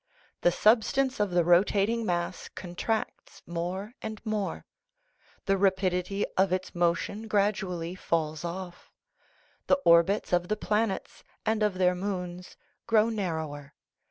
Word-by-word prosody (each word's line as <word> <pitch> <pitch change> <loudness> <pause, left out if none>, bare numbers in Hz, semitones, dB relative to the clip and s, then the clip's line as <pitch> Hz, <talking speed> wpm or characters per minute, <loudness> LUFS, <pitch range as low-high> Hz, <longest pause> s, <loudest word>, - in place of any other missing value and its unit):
The 175 - +4
substance 245 +7 +3
of 205 -1 +2
the 175 -1 +2
rotating 200 +6 +3
mass 175 0 -2
contracts 190 +5 -4
more 180 +6 -4
and 215 -1 -5
more; 215 -3 -2 0.8
the 195 -1 +2
rapidity 190 0 +1
of 190 0 +3
its 185 0 -2
motion 175 +5 0
gradually 195 -5 0
falls 160 -3 -2
off. 175 +1 -6 0.8
The - - +5
orbits 170 +4 +4
of 175 0 +2
the 215 - -1
planets 210 -1 -1 0.2
and 220 0 +1
of 210 -3 +2
their 180 -1 +3
moons 180 -1 -5 0.3
grow 225 -1 +4
narrower. 160 -9 -4
190 Hz, 125 wpm, -28 LUFS, 175-210 Hz, 0.8 s, The